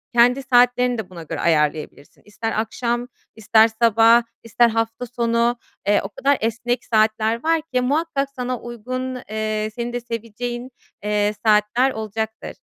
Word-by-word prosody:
kendi 245 +3 +4
saatlerini 245 -1 +3
de 220 -4 -5
buna 175 -3 -9
göre 160 - -6
ayarlayabilirsin. 150 -2 -1
İster 210 +2 -4
akşam, 240 +2 -2 0.3
ister 220 +1 +4
sabah, 230 +1 +5 0.2
ister 235 +1 +3
hafta 225 +2 -2
sonu, 235 0 0 0.3
eee, 205 0 +4
o 195 - -5
kadar 275 +7 +1
esnek 235 +2 -1
saatler 220 +1 +1
var 325 0 +2
ki 250 - +2
muhakkak 280 +1 0
sana 250 -1 -3
uygun, 255 +2 -5
eee, 215 0 -2
senin 240 0 -4
de 245 - -1
seveceğin, 240 +2 -5 0.3
eee, 210 0 +1
saatler 215 +5 +3
olacaktır. 220 0 -5
230 Hz, 140 wpm, -21 LUFS, 215-245 Hz, 0.3 s, sabah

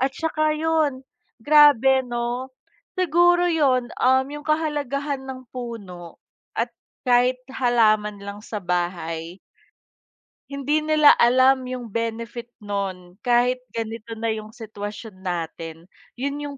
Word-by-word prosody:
at 265 +1 +2
saka 310 -1 0
'yon. 310 -4 0 0.4
Grabe 270 -2 +6
'no. 240 +2 -3 0.5
Siguro 350 +1 +4
'yon, 265 -7 +2
um, 260 +1 +4
'yong 295 +1 -7
kahalagahan 290 -3 -1
ng 260 -1 -8
puno 200 -9 -8 0.4
at 235 +1 0 0.4
kahit 250 +1 +4
halaman 215 -5 +2
lang 200 +1 -8
sa 210 - -4
bahay 175 -1 -3 1.1
hindi 280 +2 0
nila 305 -1 +6
alam 255 +2 +4
'yong 250 -2 -6
benefit 230 +2 -4
no'n 195 -3 -4
kahit 250 +1 +2
ganito 225 0 -5
na 225 0 -2
'yong 215 0 -4
sitwasyon 210 -3 -8
natin. 165 -1 -5 0.2
'Yon 280 +3 -3
'yong 290 -1 -6
245 Hz, 115 wpm, -23 LUFS, 210-280 Hz, 1.1 s, Grabe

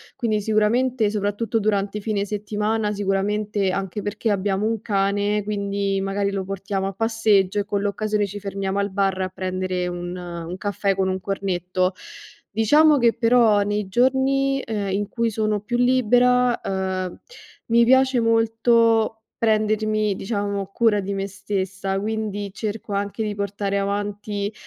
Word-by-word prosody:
Quindi 220 -4 0
sicuramente, 220 +2 +2
soprattutto 210 +2 -1
durante 205 -1 0
i - - -5
fine 205 -1 -1
settimana, 210 +1 -1
sicuramente 200 0 0
anche 195 +2 -3
perché 210 +2 -2
abbiamo 200 0 0
un 225 -2 -1
cane, 205 0 0
quindi 200 -1 -1
magari 195 +1 -1
lo 195 -1 -3
portiamo 195 0 -3
a 195 - -4
passeggio 210 -2 +2
e 200 - -1
con 200 -1 -1
l'occasione 210 +1 0
ci 205 +1 -7
fermiamo 195 0 -3
al 200 0 0
bar 195 -1 0
a 185 - 0
prendere 185 -1 -3
un 175 0 -5
un 175 -1 -6
caffè 200 -1 -1
con 190 0 0
un 185 - -1
cornetto. 185 -1 -1 0.6
Diciamo 295 +8 +5
che 235 -3 +4
però 230 -3 +4
nei 205 0 -1
giorni, 265 +4 +2
ehm, 205 -3 -2
in 200 +1 -1
cui 230 +1 -1
sono 215 -1 -1
più 240 +4 -2
libera, 250 0 +3
uhm, 190 -1 -3 0.5
mi 235 0 +4
piace 260 +1 +4
molto 225 -1 +2
prendermi, 215 -1 +1
diciamo, 200 -1 -2
cura 210 +1 +2
di 200 0 -3
me 195 0 -3
stessa, 195 -1 -3
quindi 205 -1 -3
cerco 215 0 -5
anche 200 +2 -2
di 210 -1 -3
portare 200 0 -2
avanti, 205 +1 -3
205 Hz, 150 wpm, -23 LUFS, 195-220 Hz, 0.6 s, Diciamo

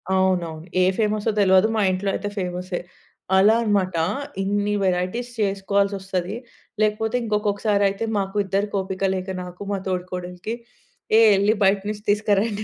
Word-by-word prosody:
అవును. 185 -2 +2
అవును. 160 +1 -9 0.2
ఏ - - +4
ఫేమస్సో 215 0 +1
తెలవదు. 190 +1 +5
మా - - +2
ఇంట్లో 190 +2 -1
అయితే 205 +1 -3
ఫేమస్సే. 180 0 -3 0.6
అలా 210 +4 +6
అన్నమాట. 195 -4 +1 0.5
ఇన్ని 205 +1 0
వెరైటీస్ 185 +7 -1
చేసుకోవాల్సొస్తది. 195 -1 -1 0.5
లేకపోతే 215 +2 0
ఇంకొకసారి 210 -1 +1
అయితే, 200 +3 -3
మాకు 195 +1 -4
ఇద్దరికి 200 +2 -1
ఓపిక 190 0 -5
లేక 185 +1 -4 0.2
నాకు 180 +2 -11
మా - - 0
తోడికోడలికి 180 +3 -4 0.6
ఏ - - +7 0.2
ఎళ్లి 205 +2 +3
బయటనుంచి 205 +2 +1
తీసుకురండి 210 +1 +1
200 Hz, 135 wpm, -23 LUFS, 185-210 Hz, 0.6 s, ఏ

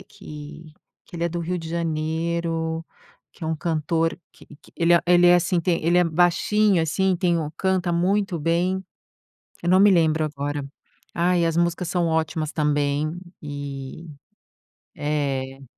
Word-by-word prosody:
que 150 +1 -11 0.3
que - - -16
ele 170 - -4
é - - +1
do 175 +1 -4
Rio 170 +2 -2
de 165 -1 -7
Janeiro, 165 0 -2 0.5
que - - -9
é - - -2
um 160 - 0
cantor 165 +1 -1
que - - -17 0.2
que - - -21
ele 170 0 +3
ele 175 0 +5
é 175 - +7
assim, 175 0 +1
tem 170 0 0
ele 175 +1 +4
é 180 - +4
baixinho 175 +3 +2
assim, 185 +4 +1
tem 175 -2 +1
o 155 -2 -2
canta 190 -2 0
muito 185 +1 +1
bem, 180 +4 0 0.8
eu 175 - -2
não 185 +1 +5
me 205 +1 +7
lembro 160 -3 +3
agora. 145 0 -4 0.5
Ai, 175 0 +2
as 165 -1 -1
músicas 170 +1 0
são 175 -2 0
ótimas 160 -1 -1
também. 145 0 0 0.3
E, 145 +2 -7 0.9
eh 140 -2 -2
165 Hz, 155 wpm, -23 LUFS, 155-175 Hz, 0.9 s, é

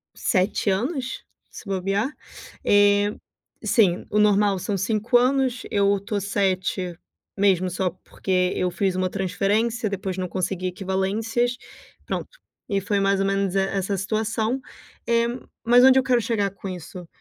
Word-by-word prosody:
7 195 +1 +1
anos, 255 - -2 0.3
se - - -11
bobear. 195 +5 -1 0.5
Eh, 205 0 +4 0.5
sim, 190 -7 +2
o 210 - +1
normal 205 -1 +4
são 200 +3 -2
5 215 +5 0
anos. 255 -1 +1
Eu 200 0 +2
tô 205 +1 -3
7 185 -3 -1 0.4
mesmo 190 -2 +3
só 185 +1 -1
porque 180 +1 -1
eu 180 -1 0
fiz 190 0 0
uma 185 0 0
transferência, 210 +4 0
depois 190 -1 -4
não 185 - -2
consegui 185 0 -2
equivalências, 205 +6 -1 0.5
pronto, - - -5 0.3
e 200 -1 0
foi 200 +1 0
mais 195 0 +2
ou - - +1
menos 195 -1 0
e - - +3
essa 195 0 -1
situação. 220 +4 -1 0.5
Eh, 235 0 +3 0.4
mas 245 +2 +6
onde 265 0 +7
eu - - 0
quero 250 -2 +3
chegar 210 -3 0
com 195 0 -9
isso, 180 0 -8
200 Hz, 145 wpm, -24 LUFS, 190-220 Hz, 0.5 s, onde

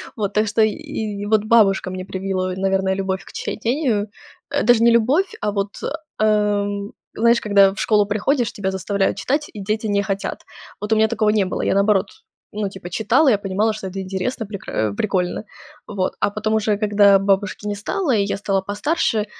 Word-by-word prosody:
Вот, 205 -3 -2
так 215 0 +2
что, 215 +2 +1
и 215 -1 +3 0.5
и - - -4
вот 215 0 +2
бабушка 205 -5 +4
мне 185 0 -6
привила, 190 -1 -2
наверное, 190 0 0
любовь 190 -1 -2
к - - -13
чтению. 230 -3 -1 0.4
Э, - - 0
даже 230 0 +4
не 235 - +6
любовь, 265 - +2
а, 210 - 0
вот, 200 0 -1 0.5
эм, 205 -1 +1 0.2
знаешь, 235 +1 +3
когда 200 -2 +5
в - - -9
школу 210 -2 +3
приходишь, 220 +4 0
тебя 190 -2 -2
заставляют 195 +1 -1
читать, 295 +3 -1
и 210 - -8
дети 215 +2 -2
не 200 -1 +1
хотят. 195 0 -4 0.4
Вот 210 +1 0
у - - +3
меня 220 0 +4
такого 220 -2 +1
не 210 -3 +2
было. 185 - -3
Я, - - +2
наоборот, 200 0 +3 0.5
ну, 205 -1 -2
типа 190 -2 -9
читала, 235 - +3
я 210 - +4
понимала, 205 +3 0
что 205 -3 -6
это 195 +1 -6
интересно, 190 +5 -3
прекра 200 -1 -8 0.2
э, 100 - -6
прикольно. 185 -1 -1 0.4
Вот, 185 -2 -2
а - - +2
потом 215 +1 -2
уже, 215 -1 +1
когда 205 -2 +4
бабушки 195 +1 0
не 205 - -2
стало, 290 - -2
и 200 - +2
я 200 - -2
стала 195 -1 0
постарше, 210 - -1
205 Hz, 195 wpm, -21 LUFS, 195-220 Hz, 0.5 s, не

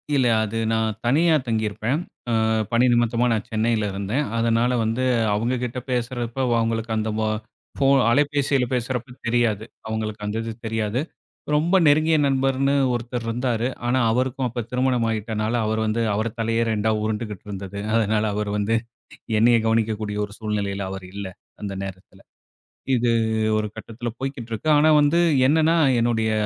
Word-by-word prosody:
இல்ல. 130 -3 +3 0.2
அது 110 +1 -3
நான் 110 -1 0
தனியா 160 +6 +4
தங்கியிருப்பேன். 110 +5 -1 0.3
அ - - +1 0.4
பணி 120 +2 +4
நிமித்தமா 120 0 +2
நான் 105 -2 -2
சென்னையில 110 -1 +1
இருந்தேன். 105 +9 -1
அதனால 115 +2 +2
வந்து 115 +3 -1 0.3
அவங்ககிட்ட 125 +2 -2
பேசுறப்ப 120 0 -2 0.2
அவங்களுக்கு 115 0 -1
அந்த 110 0 -1
போ 110 - +1 0.5
ஃபோ 135 - +2 0.2
அலைபேசியில 140 -1 +2
பேசுறப்ப 125 0 -2
தெரியாது. 115 -3 +1 0.2
அவங்களுக்கு 110 -1 -4
அந்த 105 +2 -2
இது 115 - -4 0.2
தெரியாது. 110 +2 -1 0.5
ரொம்ப 170 +5 +2
நெருங்கிய 155 +2 +4
நண்பர்ன்னு 135 0 +1 0.2
ஒருத்தர் 120 0 -3
இருந்தாரு. 120 0 -1 0.2
ஆனா, 125 +2 +2
அவருக்கும் 130 +1 0
அப்ப 120 0 -4
திருமணமாயிட்டனால 115 -4 0
அவர் 110 +1 0
வந்து, 110 +2 0
அவர் 110 +3 0
தலையே 115 +1 +1
2 110 0 0
உருண்டுகிட்டு 105 -2 -4
இருந்தது. 100 0 -6
அதனால, 110 -1 +2
அவர் 105 0 -2
வந்து 105 +2 0 0.7
என்னைய 115 +1 +5
கவனிக்கக்கூடிய 110 -2 0
ஒரு 100 - -9
சூழ்நிலையில 100 -2 -2
அவர் 95 -1 -6
இல்ல. 100 0 -5 0.4
அந்த 100 -1 -4
நேரத்தில 95 -1 -10 0.8
இது 120 0 +1 0.5
ஒரு 105 0 -1
கட்டத்தில 115 +2 -6
போய்க்கிட்டு 130 -4 -5
இருக்கு. 115 +8 -2
ஆனா, 155 +2 +5
வந்து 145 +4 +3 0.3
என்னென்னா 160 +2 +3 0.2
என்னுடைய 115 -2 +1
115 Hz, 140 wpm, -23 LUFS, 110-125 Hz, 0.8 s, என்னைய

